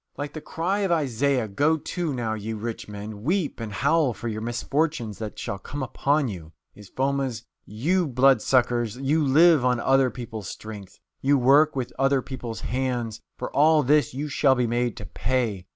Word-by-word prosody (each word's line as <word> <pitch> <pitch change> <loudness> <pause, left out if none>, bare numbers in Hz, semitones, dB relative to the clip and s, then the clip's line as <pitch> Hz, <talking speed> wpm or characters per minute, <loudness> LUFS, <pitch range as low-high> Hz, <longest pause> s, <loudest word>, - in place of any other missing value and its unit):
Like 145 0 -5
the 155 - -6
cry 180 +7 -2
of 195 -3 0
Isaiah, 140 -5 +1
"Go 145 +10 +2
to, 170 +1 -3
now, 120 -4 -2
ye 110 +1 -4
rich 110 +1 -5
men, 105 0 -7
weep 165 - -1
and 115 -2 -5
howl 140 +3 +2
for 120 - -6
your 110 -1 -3
misfortunes 120 0 -2
that 110 -2 -6
shall 100 - -4
come 145 +8 -6
upon 140 +2 +1
you," 85 -7 -8 0.2
is 105 -2 -14
Foma's: 135 -4 -2 0.2
"You 165 - 0
blood 135 +1 +4
suckers! 120 -3 +1
You 145 +4 +1
live 155 +1 +5
on 125 -1 +2
other 135 +1 +3
people's 115 -5 -7
strength; 105 -2 -9 0.2
you 140 +1 +3
work 140 +4 +4
with 130 -3 -3
other 135 -1 +2
people's 120 -4 -6
hands! 120 -4 -2 0.2
For - - -6
all 155 +1 +5
this 150 +3 +3
you 140 +4 -4
shall 135 -2 +3
be 125 -1 +1
made 120 0 -1
to - - -7
pay! 115 -6 -2
130 Hz, 185 wpm, -25 LUFS, 115-145 Hz, 0.2 s, live